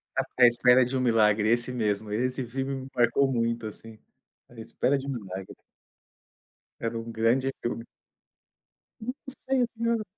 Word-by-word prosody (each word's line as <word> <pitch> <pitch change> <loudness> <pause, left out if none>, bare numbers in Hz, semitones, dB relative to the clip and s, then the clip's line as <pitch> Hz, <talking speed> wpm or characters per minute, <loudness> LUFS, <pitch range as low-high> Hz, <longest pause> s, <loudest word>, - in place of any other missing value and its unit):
À 130 - +2
À 125 -1 +8
Espera 125 +1 +5
de 125 +2 -3
Um - - 0
Milagre, 110 -3 +3
esse 120 +2 +1
mesmo, 110 -3 -1
esse 125 +4 -1
filme 135 +3 -3
me 130 0 -7
marcou 135 +3 +3
muito, 115 -2 -1
assim. 110 +1 -11 0.5
À 120 - -14
Espera 130 +4 0
de 135 - -6
Um - - -2
Milagre. 95 -6 -7 1.3
Era 115 0 -2
um 115 0 -6
grande 115 +4 +1
filme. 120 0 -3 1.2
Hum, 245 +3 -3
não 265 - -4
sei 265 -2 +3
o 240 - 0
que 230 0 -4
era 230 -2 +1
120 Hz, 170 wpm, -27 LUFS, 115-135 Hz, 1.3 s, À